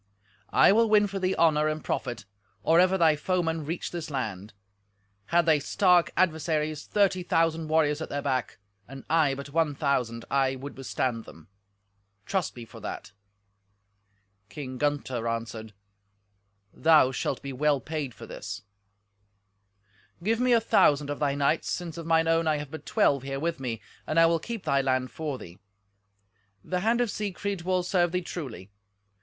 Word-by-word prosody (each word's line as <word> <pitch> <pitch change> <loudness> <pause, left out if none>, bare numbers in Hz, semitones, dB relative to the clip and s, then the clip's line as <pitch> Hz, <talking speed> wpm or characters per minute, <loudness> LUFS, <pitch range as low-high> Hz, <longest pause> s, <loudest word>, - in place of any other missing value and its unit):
I - - +7
will 225 +2 +4
win 210 -1 +5
for 200 -1 -4
thee 185 0 0
honour 155 -2 +3
and 155 0 -2
profit 120 -8 -3 0.4
or 165 +1 +4
ever 185 +1 +4
thy 160 -3 +4
foemen 165 0 -1
reach 170 +2 -4
this 170 -3 -5
land. 110 -7 -4 0.8
Had 170 0 +3
they 155 -2 +4
stark 180 +2 +3
adversaries 155 -3 0
thirty 195 -3 +2
thousand 165 -2 +1
warriors 155 -1 +2
at - - -5
their 145 0 -3
back, 130 -3 -1 0.3
and 135 +1 -10
I 155 -4 +3
but 140 +1 -8
one 155 -2 +1
thousand, 125 -6 -1
I 135 -1 +2
would 140 +2 -8
withstand 125 -3 -2
them—trust 100 - -8
me 120 -2 -8
for 115 - -13
that." 105 0 -7 1.4
King 130 -3 -7
Gunther 135 -5 -1
answered, 115 -1 -4 1.0
"Thou 155 -5 +5
shalt 130 0 -3
be 140 -1 -5
well 145 +1 +2
paid 150 -6 -5
for - - -10
this." - - -7 1.6
"Give 225 +4 +1
me 250 0 +2
a 235 - +6
thousand 145 -9 +3
of 145 - -4
thy 140 -2 +1
knights, 140 -1 +1
since 170 -3 -4
of 165 - -7
mine 165 0 +3
own 165 0 +2
I 155 -1 +2
have 145 -1 -7
but 160 - -9
twelve 145 - +2
here 135 +1 -4
with 165 0 -2
me, 115 -5 -4 0.2
and 155 - +2
I 165 - +7
will 165 0 +2
keep 230 +4 -6
thy 140 0 +2
land 130 -1 0
for 150 -4 -4
thee. 90 -5 -12 1.0
The 180 - -2
hand 230 +5 +2
of 240 -4 0
Siegfried 200 -2 -3
will 185 +1 0
serve 175 -1 +1
thee 180 - 0
truly. 125 - -7
150 Hz, 165 wpm, -27 LUFS, 130-170 Hz, 1.6 s, I